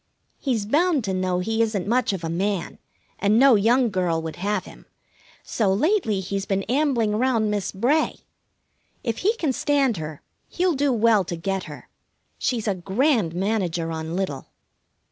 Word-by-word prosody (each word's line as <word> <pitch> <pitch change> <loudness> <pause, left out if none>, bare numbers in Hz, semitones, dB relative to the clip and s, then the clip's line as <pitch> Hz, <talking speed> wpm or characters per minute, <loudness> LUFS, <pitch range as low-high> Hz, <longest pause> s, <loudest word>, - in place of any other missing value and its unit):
He's 235 -7 -1
bound 300 - +2
to 195 -2 -2
know 185 -1 0
he 220 +4 0
isn't 215 -5 0
much 240 +3 +1
of 190 -4 -4
a 165 - -2
man, 190 +1 -2 0.4
and 210 +2 +3
no 270 +1 +7
young 230 +3 +3
girl 180 -4 0
would 160 -1 -6
have 195 +1 -1
him, - - -14 0.6
so 210 -4 0
lately 225 - +1
he's 195 +1 -4
been 195 0 0
ambling 240 -4 +1
'round 230 -4 +1
Miss 205 -2 -2
Bray. 255 +11 0 0.8
If 230 -3 -2
he 425 +5 +2
can 310 - -1
stand 280 -5 +1
her, 155 -2 -7 0.2
he'll 360 -1 0
do 285 -1 +1
well 225 -3 +3
to 170 - -4
get 190 +3 -3
her. - - -10 0.5
She's 230 -4 -1
a 205 - +2
grand 195 - 0
manager 180 -4 -1
on 160 +1 -4
little. 185 -8 -3
210 Hz, 165 wpm, -23 LUFS, 185-255 Hz, 0.8 s, no